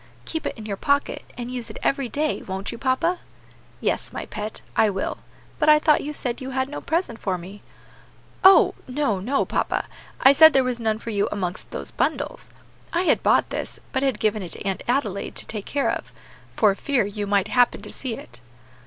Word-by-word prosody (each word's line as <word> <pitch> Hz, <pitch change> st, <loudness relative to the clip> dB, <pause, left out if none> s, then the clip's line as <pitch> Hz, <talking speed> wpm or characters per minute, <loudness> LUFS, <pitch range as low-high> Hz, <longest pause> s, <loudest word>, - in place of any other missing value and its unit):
"Keep 320 Hz, -, -3 dB
it -, -, -5 dB
in 215 Hz, -, -8 dB
your 200 Hz, -2 st, -3 dB
pocket, 285 Hz, +5 st, 0 dB
and 245 Hz, 0 st, -5 dB
use 240 Hz, -3 st, -4 dB
it 215 Hz, -, -8 dB
every 275 Hz, -3 st, +1 dB
day, 300 Hz, +3 st, -1 dB
won't 190 Hz, +1 st, -5 dB
you, 235 Hz, -, -8 dB
papa?" 330 Hz, +7 st, +1 dB, 0.6 s
"Yes, -, -, -1 dB
my -, -, -5 dB
pet, 215 Hz, 0 st, -6 dB
I 220 Hz, -, +4 dB
will; 195 Hz, -1 st, -3 dB, 0.4 s
but -, -, +4 dB
I 305 Hz, -, +9 dB
thought 300 Hz, 0 st, +4 dB
you 295 Hz, -, -4 dB
said 250 Hz, -4 st, -3 dB
you 260 Hz, -, -5 dB
had 260 Hz, 0 st, -1 dB
no 295 Hz, -, -6 dB
present 320 Hz, -9 st, -1 dB
for 190 Hz, -2 st, -1 dB
me?" 190 Hz, +4 st, -10 dB, 0.8 s
"Oh! 385 Hz, 0 st, +8 dB
no, 255 Hz, -7 st, 0 dB
no, 255 Hz, +9 st, 0 dB
papa; -, -, -1 dB, 0.3 s
I 270 Hz, -, +7 dB
said 315 Hz, +2 st, +8 dB
there 270 Hz, -, +4 dB
was 250 Hz, -1 st, -1 dB
none 220 Hz, -2 st, 0 dB
for 230 Hz, +1 st, -6 dB
you 205 Hz, -1 st, +1 dB
amongst 185 Hz, -3 st, -3 dB
those -, -, -6 dB
bundles. -, -, -2 dB, 0.4 s
I 345 Hz, +1 st, +1 dB
had -, -, +3 dB
bought -, -, +3 dB
this, -, -, -4 dB
but 265 Hz, -, +1 dB
had 265 Hz, -6 st, 0 dB
given 215 Hz, -1 st, +1 dB
it 180 Hz, -, -6 dB
to -, -, -8 dB
Aunt 195 Hz, -1 st, -1 dB
Adelaide 230 Hz, -6 st, -1 dB
to -, -, -2 dB
take 210 Hz, -2 st, -5 dB
care 280 Hz, -1 st, +1 dB
of, -, -, -5 dB, 0.4 s
for 210 Hz, -3 st, +4 dB
fear 255 Hz, +2 st, 0 dB
you 205 Hz, 0 st, -4 dB
might 200 Hz, -1 st, +2 dB
happen 245 Hz, -1 st, +3 dB
to -, -, -8 dB
see 255 Hz, -4 st, -4 dB
it." 120 Hz, -, -9 dB
240 Hz, 210 wpm, -24 LUFS, 205-280 Hz, 0.8 s, I